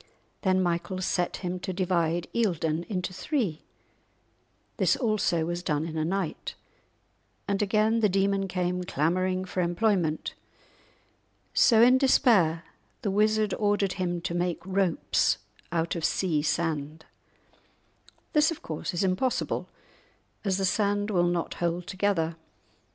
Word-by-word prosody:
Then 185 -2 +2
Michael 175 +1 -1
set 180 -1 -1
him 180 +1 -2
to 185 - -4
divide 175 -2 0
Eildon 170 -7 0
into 185 -2 -3
three; 195 - -2 1.1
this - - +3
also 210 -8 +1
was 175 +1 -3
done 150 -2 -1
in 165 -1 -6
a 155 - 0
night, 185 0 -3 0.9
and 200 0 0
again 215 +2 +2
the 210 -2 +3
demon 195 +1 +1
came 180 0 -1
clamouring 185 +4 0
for 185 0 -2
employment. 175 -3 0 1.2
So 225 -2 +6
in 255 +2 +6
despair 205 - +4 0.4
the 205 - 0
wizard 215 0 +2
ordered 205 -2 +1
him 175 -2 -2
to 170 - -3
make 175 0 -2
ropes 190 -3 +1 0.3
out 165 0 0
of 170 - -4
sea 165 -4 +1
sand! 155 -1 -2 1.3
This, 300 0 +4
of 330 - -6
course, 160 +2 -4
is 175 - 0
impossible, 195 +7 0 0.7
as 195 -3 +1
the 195 - 0
sand 205 +1 +1
will 175 -3 +3
not 175 -1 -1
hold 175 0 -1
together. 185 -4 0
185 Hz, 130 wpm, -27 LUFS, 170-205 Hz, 1.3 s, So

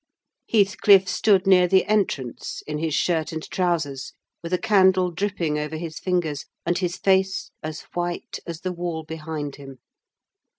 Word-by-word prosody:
Heathcliff 200 -2 +5
stood 190 +1 +3
near 185 -2 +6
the 190 +1 +4
entrance, 180 - -1
in 150 0 -4
his 160 -2 -1
shirt 165 -3 0
and 160 -1 -5
trousers; 155 -7 -1 0.3
with 170 - -7
a 180 - +2
candle 185 -2 +4
dripping 170 -4 -1
over 150 +1 -4
his 160 -1 -6
fingers, 170 -6 -1 0.2
and 175 - +1
his 180 0 -2
face 190 -1 +1
as 155 -1 -5
white 175 0 -3
as 170 0 -6
the 185 -1 -3
wall 170 -2 -4
behind 155 -2 -6
him. 135 -2 -11
175 Hz, 155 wpm, -24 LUFS, 155-190 Hz, 0.3 s, near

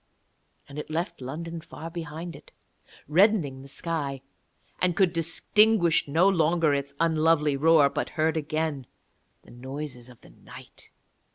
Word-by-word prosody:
And 145 +1 -8
it - - -7
left 165 -1 -3
London 165 +6 -6
far 165 0 -9
behind 165 +1 -7
it, - - -15 0.6
reddening 165 -5 +2
the 135 - -12
sky, 140 -2 -3 0.6
and 180 -2 +2
could 185 -2 +2
distinguish 175 +2 +2
no 165 +6 +3
longer 165 -4 +2
its 140 0 -3
unlovely 160 -2 +2
roar, 155 0 +5
but - - -3
heard 160 0 +2
again 155 -3 -2 0.6
the - - -17
noises 130 0 -7
of 120 - -17
the - - -17
night. - - -14
160 Hz, 140 wpm, -26 LUFS, 140-170 Hz, 0.6 s, roar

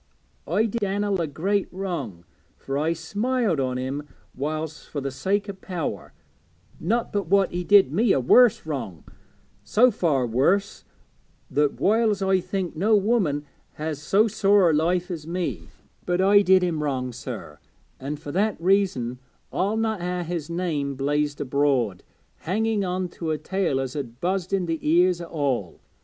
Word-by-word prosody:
I 200 +8 +2
did 230 +1 -3
Dan'el 200 -1 0
a 165 - -1
great 190 +8 -1
wrong, 155 - -5 0.3
for 135 - -5
I 155 +3 +1
smiled 205 - -1
on 130 -1 -1
him 135 +3 -4 0.3
whiles 155 +3 -4
for 145 - -4
the 135 0 -3
sake 200 +9 -1
o' 200 - -4
power; 185 -4 -5 0.7
not 230 +7 -1
but 200 -4 -1
what 195 +1 +3
he 175 0 -3
did 195 -7 +5
me 215 +4 +3
a - - +3
worse 235 - +5
wrong, 130 - -5 0.6
so 235 - +4
far 145 - +1
worse 145 - +1 0.7
that 145 +1 +1
whiles 215 -1 +2
I 190 -1 +3
think 185 -1 -3
no 210 +7 +3
woman 195 -9 +1 0.3
has 155 -1 -4
so 200 +9 +3
sore 200 -4 +4
a - - 0
life 175 +4 +1
as 160 -3 -6
me; 175 0 -3 0.4
but 175 0 +1
I 200 +2 +6
did 190 -1 +5
do - - +2
him 160 -3 -2
wrong, 130 -4 -2
sir, 115 - -8 0.4
and 145 +3 -5
fur 150 -2 -7
that 205 +4 0
reason 170 -10 +1 0.3
I'll 205 +4 0
not 220 -3 -1
ha' 180 0 -2
his 170 -2 -4
name 160 -5 -2
blazed 145 +2 -1
abroad, 135 -8 +1 0.4
hanging 215 +4 0
on 185 0 -2
to 165 -1 -5
a 155 - 0
tale 185 -6 -1
as 130 0 -4
'ud 125 -4 -6
buzz 185 +2 -1
i' 195 - +3
the 165 -4 -2
ears 175 +3 +3
o' - - -5
all. 140 - -2
170 Hz, 170 wpm, -24 LUFS, 145-195 Hz, 0.7 s, I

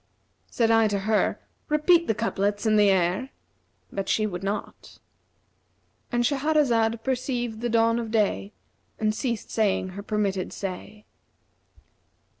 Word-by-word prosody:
Said 230 -2 +1
I 225 -1 +5
to 200 -2 -1
her, 215 +1 +1 0.3
'Repeat 330 +3 +4
the 220 - +1
couplets 205 -1 -1
and 215 -1 +4
the 205 -1 +5
air!' 190 +7 +1 0.6
But 195 -1 -4
she 215 - +2
would 180 -4 -4
not:'"—And 215 +3 -7
Shahrazad 245 -5 +1
perceived 245 -3 -2
the 240 - -1
dawn 230 0 +3
of 230 -2 -4
day 210 -2 0 0.5
and 215 -1 0
ceased 235 -1 -3
saying 200 -4 +1
her 190 +2 -7
permitted 200 -3 -2
say. 200 +2 -7
220 Hz, 125 wpm, -25 LUFS, 200-240 Hz, 0.6 s, I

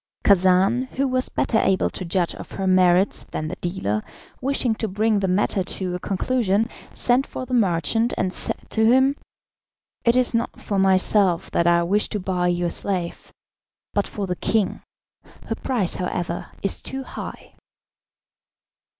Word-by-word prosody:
Khacan, 195 +6 +4
who 275 +1 +1
was 255 0 0
better 220 - +1
able 190 -2 +2
to - - -5
judge 175 0 0
of - - -10
her 195 - -3
merits 185 +1 +3
than 155 - -4
the 185 - -4
dealer, 140 - -2 0.4
wishing 260 -3 +1
to 220 0 -3
bring 210 +2 +1
the 195 - 0
matter 190 +1 +1
to 180 0 -3
a 180 - -3
conclusion, 210 +2 0 0.2
sent 250 +3 +1
for 255 - -6
the 255 - -6
merchant, 225 - +2
and 185 - -1
said - - 0
to 220 - +2
him, 265 +3 +4 0.9
"It 235 -1 +3
is 255 -1 +3
not 230 +1 -1
for 200 -2 -2
myself 190 -1 +3
that 170 - +2
I 170 0 +4
wish 200 +5 +1
to 210 - -2
buy 180 -1 -1
your 175 -1 0
slave, 180 -3 -2 0.6
but 205 - +1
for 205 - -4
the 180 -1 -2
king. 215 +2 0 0.6
Her - - -2
price, 230 -9 -1
however, 175 -1 -3 0.2
is 195 - 0
too 265 0 -4
high." - - -8
195 Hz, 160 wpm, -23 LUFS, 180-230 Hz, 0.9 s, Khacan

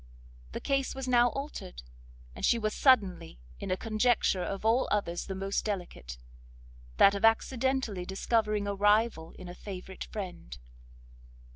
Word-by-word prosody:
The - - -3
case 275 -1 -1
was 265 -1 -5
now 245 -1 +5
altered; 275 - -7 0.5
and - - -9
she 235 - +4
was 215 -1 -1
suddenly 195 - +2 0.2
in - - -5
a 185 - 0
conjuncture 220 -3 +1
of 195 +3 -4
all 230 +4 +3
others 175 -4 -1
the 190 - -4
most 195 +1 -2
delicate, 175 - -5 0.8
that 200 - +7
of 200 +1 -4
accidentally 235 -2 +1
discovering 210 +2 0
a 200 - -1
rival 205 -4 +2
in 185 - -9
a 175 - -7
favourite 190 0 -8
friend. 180 - -7
205 Hz, 145 wpm, -30 LUFS, 185-235 Hz, 0.8 s, that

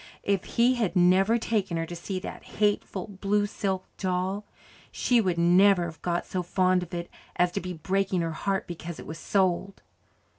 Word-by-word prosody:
If 200 -2 0
he 240 +2 +3
had 225 -7 -1
never 185 +5 +4
taken 205 -6 -1
her 165 - -1
to 175 - -7
see 185 +2 -4
that - - -7
hateful, 205 -2 0
blue 205 +1 0
silk 190 -2 -2
doll, 190 +2 -1 0.5
she 245 -2 +2
would 180 -4 0
never 180 +2 +5
have 160 -2 -8
got 175 -1 -1
so 185 - -2
fond 185 +1 +2
of 180 - -7
it 170 0 -4 0.3
as 180 0 +2
to - - -3
be 180 +1 -5
breaking 190 +2 0
her 165 -1 -1
heart 195 +4 -1
because 170 -1 -7
it - - -9
was 160 - -7
sold. 190 0 0
185 Hz, 185 wpm, -27 LUFS, 175-200 Hz, 0.5 s, never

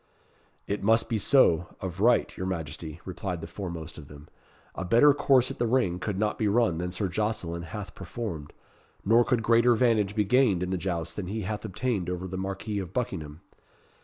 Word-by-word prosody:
"It 100 - -3
must 115 +3 +3
be 110 - 0
so, 90 - +3
of 95 -1 -5
right, 120 +4 +3
your 95 - -4
Majesty," 80 -2 -5
replied 90 -1 -4
the 80 - -6
foremost 85 -2 -7
of 75 - -11
them. 75 +1 -13 0.4
"A - - -4
better 120 +10 +6
course 130 -3 +3
at - - -9
the 120 - +1
ring 110 -8 +1
could 100 +1 -3
not 105 +1 -1
be 110 - +1
run 105 -6 +2
than 90 +1 -2
Sir 95 +2 -1
Jocelyn 90 -3 -2
hath 105 +4 -7
performed, 90 -6 -6 0.5
nor 115 +4 +5
could 120 -2 0
greater 115 +2 +4
'vantage 110 -4 +2
be 105 -2 +2
gained 105 -5 +3
in 90 - -3
the 95 - 0
jousts 85 -3 -3
than 100 -3 -4
he 110 +4 -3
hath 105 +2 -4
obtained 105 -2 -2
over 90 +1 -3
the 95 - -6
Marquis 95 +2 -3
of 95 -4 -6
Buckingham. 80 -11 -4
95 Hz, 195 wpm, -27 LUFS, 85-115 Hz, 0.5 s, better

